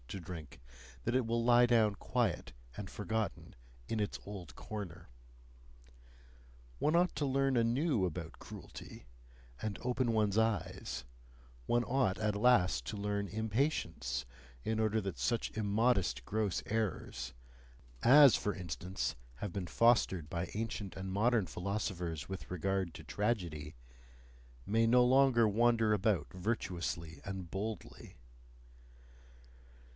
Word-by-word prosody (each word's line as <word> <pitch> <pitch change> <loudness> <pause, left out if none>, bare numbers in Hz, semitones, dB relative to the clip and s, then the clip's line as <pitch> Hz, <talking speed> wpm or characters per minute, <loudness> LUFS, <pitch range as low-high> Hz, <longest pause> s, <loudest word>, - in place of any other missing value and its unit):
] - - -25
to 95 - -4
drink, 85 -3 -8 0.4
that 120 - 0
it 130 -2 +2
will 115 +1 0
lie 120 +1 +6
down 115 -4 +3
quiet 115 -3 -1 0.2
and 100 -3 -6
forgotten, 110 0 -3 0.3
in 115 - -1
its 105 - -2
old 100 -5 -8
corner. 90 -5 -7 1.7
One 155 +3 +3
ought 180 +1 +2
to 145 - 0
learn 135 0 +2
anew 120 - +2
about 85 -1 -5
cruelty, - - -10 0.6
and 105 -3 -3
open 125 -1 +1
one's 105 -2 +2
eyes; 100 - -1 0.6
one 120 - +2
ought 125 -7 +1
at 105 -1 0
last 100 - +4
to 105 - -4
learn 100 -1 -2
impatience, 105 - -1 0.4
in 110 0 0
order 110 0 +2
that 95 - -4
such 115 - 0
immodest 105 - +1
gross 105 -3 0
errors 90 - -2 0.7
as, 140 0 +9
for 105 - -1
instance, 90 +1 -3 0.2
have 90 +7 -5
been 95 -3 -3
fostered 95 -10 +3
by 85 +1 -3
ancient 105 -3 -3
and 95 0 -4
modern 110 +1 +3
philosophers 90 -6 -3
with 95 -1 -7
regard 95 -1 -1
to - - -9
tragedy 85 -5 -2 0.9
may 115 +2 +3
no 125 +1 +6
longer 130 -3 +5
wander 115 0 +3
about 105 -2 +1
virtuously 90 -5 -3
and 95 -3 -5
boldly. 105 +1 -6
105 Hz, 125 wpm, -34 LUFS, 90-115 Hz, 1.7 s, as